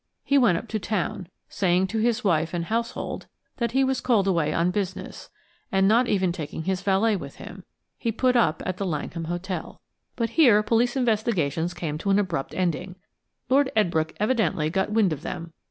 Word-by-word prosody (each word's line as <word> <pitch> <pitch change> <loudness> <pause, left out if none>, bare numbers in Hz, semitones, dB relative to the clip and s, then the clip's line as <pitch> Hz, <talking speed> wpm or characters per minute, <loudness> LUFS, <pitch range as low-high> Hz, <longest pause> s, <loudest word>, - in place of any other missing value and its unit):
He 280 - +1
went 205 -10 +4
up 235 - -6
to 220 - -2
town, 190 -3 -2 0.2
saying 185 -1 +1
to 220 +2 -1
his 235 +1 +1
wife 165 -3 +1
and 170 -1 -2
household 230 +4 -3 0.3
that 235 -1 -1
he 270 +1 +3
was 265 0 0
called 225 -6 +2
away 165 -5 +1
on 170 +3 +1
business, 190 -1 -4 0.4
and 195 0 +3
not 235 +4 +4
even 190 -4 +1
taking 160 -2 -5
his 190 +1 -1
valet 200 +3 +2
with 140 -7 -7
him. 185 0 -11 0.3
He 230 - -1
put 250 +3 +1
up 195 -10 +2
at 185 -1 -2
the 200 - -2
Langham 165 0 -3
Hotel. 175 +3 -5 0.4
But 230 -1 -1
here 230 -8 +5
police 235 +3 +2
investigations 195 - 0
came 155 -3 -4
to 200 - -2
an 195 - +4
abrupt 180 -9 -2
ending. 180 0 -1 0.5
Lord 270 +1 +3
Edbrooke 160 -6 +1
evidently 195 -9 +1
got 190 +3 0
wind 210 -6 +3
of 145 - -7
them. 165 -1 -6
190 Hz, 185 wpm, -25 LUFS, 170-225 Hz, 0.5 s, here